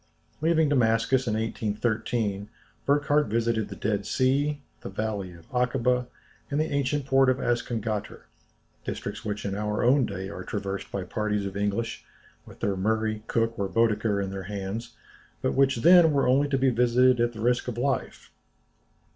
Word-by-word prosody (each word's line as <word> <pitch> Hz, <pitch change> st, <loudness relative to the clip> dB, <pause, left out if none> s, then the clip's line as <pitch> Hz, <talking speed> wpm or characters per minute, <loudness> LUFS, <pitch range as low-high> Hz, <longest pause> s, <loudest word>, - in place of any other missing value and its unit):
Leaving 160 Hz, -1 st, +3 dB
Damascus 125 Hz, -1 st, +2 dB
in 110 Hz, -, +1 dB
1813, 110 Hz, -1 st, -2 dB, 0.4 s
Burckhardt 145 Hz, +1 st, +3 dB
visited 115 Hz, -1 st, 0 dB
the 100 Hz, -, -7 dB
Dead 100 Hz, -1 st, -1 dB
Sea, 140 Hz, +4 st, +1 dB, 0.2 s
the -, -, -7 dB
valley 100 Hz, -2 st, -3 dB
of 85 Hz, -1 st, -16 dB
Akâba, 125 Hz, 0 st, +1 dB, 0.4 s
and 145 Hz, -, -1 dB
the 155 Hz, -, 0 dB
ancient 140 Hz, 0 st, 0 dB
port 135 Hz, -1 st, +4 dB
of 130 Hz, -, +2 dB
Azcongater, 115 Hz, -4 st, -2 dB, 0.6 s
districts -, -, -5 dB
which 105 Hz, -1 st, -4 dB
in 100 Hz, -, -2 dB
our 105 Hz, +2 st, -1 dB
own 125 Hz, +1 st, +4 dB
day 95 Hz, -1 st, -5 dB
are 95 Hz, -1 st, -7 dB
traversed 100 Hz, -1 st, -4 dB
by 100 Hz, -, -3 dB
parties 105 Hz, +2 st, -2 dB
of 100 Hz, -1 st, -5 dB
English, 105 Hz, +3 st, -2 dB, 0.4 s
with -, -, -14 dB
their 100 Hz, -, 0 dB
Murray, 110 Hz, +2 st, 0 dB
Cook, 115 Hz, -1 st, 0 dB
or 100 Hz, -1 st, -1 dB
Bædeker 105 Hz, -1 st, +1 dB
in 95 Hz, -, -4 dB
their 95 Hz, -1 st, -6 dB
hands; 100 Hz, +3 st, -5 dB, 0.5 s
but -, -, +1 dB
which 135 Hz, -1 st, +3 dB
then 175 Hz, -2 st, +7 dB
were 140 Hz, -3 st, +2 dB
only 140 Hz, +3 st, +3 dB
to 135 Hz, -, +1 dB
be 130 Hz, 0 st, +3 dB
visited 125 Hz, +1 st, +4 dB
at 120 Hz, 0 st, +1 dB
the 110 Hz, -, -9 dB
risk 120 Hz, +2 st, +1 dB
of 120 Hz, -2 st, -4 dB
life. 130 Hz, +1 st, -2 dB
115 Hz, 165 wpm, -26 LUFS, 105-130 Hz, 0.6 s, then